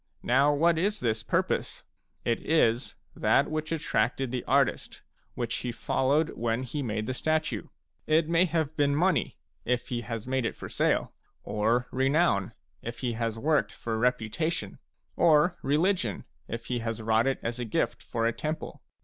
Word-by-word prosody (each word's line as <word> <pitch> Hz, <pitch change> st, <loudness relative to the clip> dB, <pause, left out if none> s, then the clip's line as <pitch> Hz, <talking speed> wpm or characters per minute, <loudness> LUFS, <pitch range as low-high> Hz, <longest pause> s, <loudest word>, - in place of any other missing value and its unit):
Now 135 Hz, +4 st, +4 dB
what 165 Hz, +3 st, +3 dB
is 205 Hz, +4 st, 0 dB
this 110 Hz, -2 st, 0 dB
purpose? -, -, -1 dB, 0.4 s
It 115 Hz, -, 0 dB
is 125 Hz, -7 st, +2 dB, 0.2 s
that -, -, +2 dB
which 155 Hz, 0 st, -3 dB
attracted 135 Hz, -5 st, 0 dB
the 125 Hz, -1 st, -2 dB
artist, -, -, +1 dB, 0.3 s
which 120 Hz, 0 st, -2 dB
he 125 Hz, -, -3 dB
followed 140 Hz, +6 st, +1 dB
when 115 Hz, +2 st, -1 dB
he 145 Hz, +4 st, -4 dB
made 110 Hz, -4 st, -2 dB
the 130 Hz, -, -2 dB
statue. 155 Hz, -5 st, -1 dB, 0.4 s
It 155 Hz, +1 st, +3 dB
may 170 Hz, +2 st, +4 dB
have 160 Hz, -3 st, -1 dB
been 145 Hz, -1 st, +2 dB
money, 180 Hz, +5 st, +1 dB, 0.3 s
if 125 Hz, 0 st, -1 dB
he 120 Hz, -1 st, -2 dB
has 115 Hz, -1 st, -5 dB
made 130 Hz, 0 st, 0 dB
it 115 Hz, -, -2 dB
for -, -, -8 dB
sale; -, -, +1 dB, 0.3 s
or 115 Hz, +4 st, +1 dB
renown, 135 Hz, -, +2 dB, 0.3 s
if 115 Hz, 0 st, -6 dB
he 125 Hz, -2 st, -1 dB
has 115 Hz, -1 st, -2 dB
worked 150 Hz, +5 st, +1 dB
for 115 Hz, -1 st, -4 dB
reputation; 125 Hz, -, -1 dB, 0.4 s
or 170 Hz, +1 st, +4 dB
religion, 150 Hz, -, +1 dB, 0.2 s
if 115 Hz, 0 st, -5 dB
he 120 Hz, 0 st, -2 dB
has 115 Hz, -1 st, -3 dB
wrought 110 Hz, +2 st, +2 dB
it 135 Hz, -, +1 dB
as 115 Hz, +1 st, -3 dB
a -, -, -1 dB
gift 110 Hz, -, -1 dB
for 115 Hz, -1 st, -2 dB
a 115 Hz, -, +2 dB
temple. 155 Hz, +4 st, -5 dB
125 Hz, 165 wpm, -28 LUFS, 115-155 Hz, 0.4 s, Now